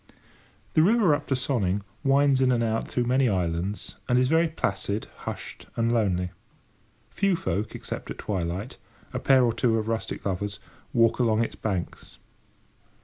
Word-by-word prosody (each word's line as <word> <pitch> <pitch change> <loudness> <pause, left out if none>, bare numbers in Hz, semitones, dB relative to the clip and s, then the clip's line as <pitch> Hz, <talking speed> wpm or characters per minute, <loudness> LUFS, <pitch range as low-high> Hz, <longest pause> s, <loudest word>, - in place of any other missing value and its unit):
The 155 - +5
river 200 -2 +4
up 145 - -2
to 135 - +1
Sonning 105 -7 0 0.2
winds 135 -1 +4
in 130 -1 +4
and 120 -2 +2
out 110 0 -1
through 125 - 0
many 125 +1 +3
islands, 90 +1 -2
and 125 - +4
is 125 0 +3
very 165 +2 +4
placid, 100 - -2
hushed, - - -7
and 115 0 +1
lonely. 90 -6 +1 0.8
Few 195 -2 +2
folk, 100 - -2
except - - -6
at - - -5
twilight, 95 +4 -3 0.4
a - - -1
pair 130 -2 +5
or 120 -2 +2
two 115 0 +2
of 110 0 -2
rustic 115 0 -3
lovers, 100 +1 -2 0.3
walk 115 +1 +3
along 115 -2 +3
its - - -4
banks. 95 -5 -4
115 Hz, 160 wpm, -26 LUFS, 100-130 Hz, 0.8 s, The